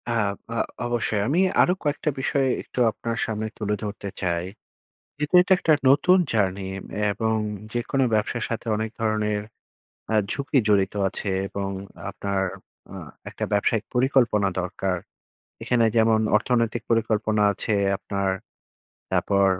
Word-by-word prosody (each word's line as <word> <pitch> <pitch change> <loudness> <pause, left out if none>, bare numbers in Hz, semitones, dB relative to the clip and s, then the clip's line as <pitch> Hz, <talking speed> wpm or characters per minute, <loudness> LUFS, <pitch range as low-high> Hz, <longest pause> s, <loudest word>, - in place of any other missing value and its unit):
আব 100 -3 +1 0.2
আ - - -2 0.3
অবশ্যই 115 -3 0
আমি 155 +7 +2 0.2
আরো 180 - +4
কয়েকটা 145 0 0
বিষয় 135 0 +1
একটু - - -7
আপনার 115 +1 -4
সামনে 110 -1 -3
তুলে 105 -1 -1
ধরতে 100 -1 -5
চাই, 85 -2 0 0.7
যেহেতু 150 +4 +3
এটা 185 - +4
একটা 160 - +3 0.2
নতুন 165 +7 +5 0.2
জার্নি 95 -3 0 0.4
এবং 110 +2 0 0.4
যেকোনো 120 +3 0
ব্যবসার 110 +2 0
সাথে 115 +1 -4
অনেক 110 +1 -2
ধরনের, 105 -1 0 0.7
আ - - +2 0.2
ঝুঁকি 140 0 +1
জড়িত 100 -2 +3
আছে 100 +1 -4 0.2
এবং 100 0 -3 0.4
আপনার 100 -1 -2 0.5
আ - - -9 0.4
একটা - - -4
ব্যবসায়িক 105 +2 +2
পরিকল্পনা 125 -5 +3
দরকার, 90 0 -2 0.7
এখানে 120 -2 +3
যেমন 110 0 +4 0.2
অর্থনৈতিক 115 0 +1
পরিকল্পনা 110 -1 +1
আছে 105 +2 -1 0.2
আপনার, 100 -1 -2 0.8
তারপর 100 -1 +2
110 Hz, 130 wpm, -24 LUFS, 100-120 Hz, 0.8 s, নতুন